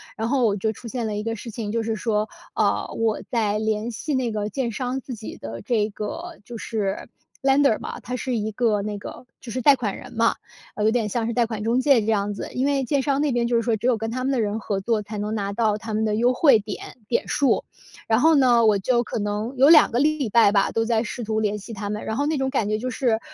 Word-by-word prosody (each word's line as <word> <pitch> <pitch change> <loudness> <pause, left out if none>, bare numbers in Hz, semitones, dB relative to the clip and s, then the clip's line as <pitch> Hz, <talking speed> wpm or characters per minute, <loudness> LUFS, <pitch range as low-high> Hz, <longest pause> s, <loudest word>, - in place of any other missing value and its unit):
然 225 +1 -2
后 260 -2 +2
我 205 -3 +2
就 215 +2 -1
出 225 +2 -10
现 235 0 -3
了 215 -1 -2
一 210 - -3
个 225 0 -2
事 230 +1 -8
情， 215 -2 -4
就 230 -1 0
是 225 0 -1
说， 215 -1 0 0.3
呃， - - +1
我 225 -1 0
在 215 -4 0
联 220 +1 -1
系 290 +7 -4
那 255 -3 0
个 210 -1 -2
建 240 +2 -2
商 250 +4 -3
自 255 - -7
己 220 -1 -8
的 115 +1 -7
这 215 -3 +1
个 330 - -6
就 240 - -9
是 210 -4 -3 0.3
lender 270 -3 +3
嘛， - - -6
他 250 +4 -5
是 250 +1 -2
一 215 0 -2
个 215 -2 +1
那 210 0 -3
个 240 - -9
就 235 - -9
是 255 - -2
贷 280 +3 +6
款 225 -6 -3
人 - - -11
嘛， 230 0 +2 0.4
呃， 210 - -2
有 220 - +4
点 225 -3 0
像 230 +2 -1
是 235 - -2
贷 240 -1 +2
款 220 -2 -4
中 230 +3 +2
介 275 -2 +5
这 - - -4
样 205 -1 0
子。 - - -5
因 260 +2 0
为 280 -1 +1
建 275 +2 +1
商 275 0 0
那 295 -1 +1
边 240 -1 +1
就 240 - +1
是 230 - +2
说， 230 -1 +1
只 220 +3 -2
有 250 -3 +3
跟 225 +1 -4
他 255 +2 -3
们 270 - 0
的 265 - +1
人 210 0 -1
合 200 -2 -2
作， 220 +2 0
才 210 +1 -7
能 210 +1 -3
拿 200 -2 -2
到 215 0 +1
他 220 0 -6
们 220 +1 +1
的 210 -1 0
优 240 +3 +3
惠 260 -3 +5
点 210 +3 -8
点 235 - 0
数。 280 -3 +2 0.4
然 220 0 +3
后 320 +4 +5
呢， 245 -4 +5
我 210 -2 +4
就 240 +5 +1
可 - - -5
能 210 +4 -2
有 270 +2 +6
2 320 -2 +7
个 235 - 0
礼 295 -3 +1
拜 225 -1 +5
吧， 200 -1 +3
都 225 0 0
在 225 -1 +2
试 235 +1 -5
图 220 0 -1
联 210 -1 0
系 210 +3 -9
他 205 -1 -5
们， 210 +1 -4
然 220 - -2
后 285 - +1
那 310 0 0
种 265 0 0
感 225 -7 0
觉 215 - +1
就 250 +4 -3
是， 235 -3 +1
225 Hz, 305 characters per minute, -23 LUFS, 210-250 Hz, 0.4 s, 2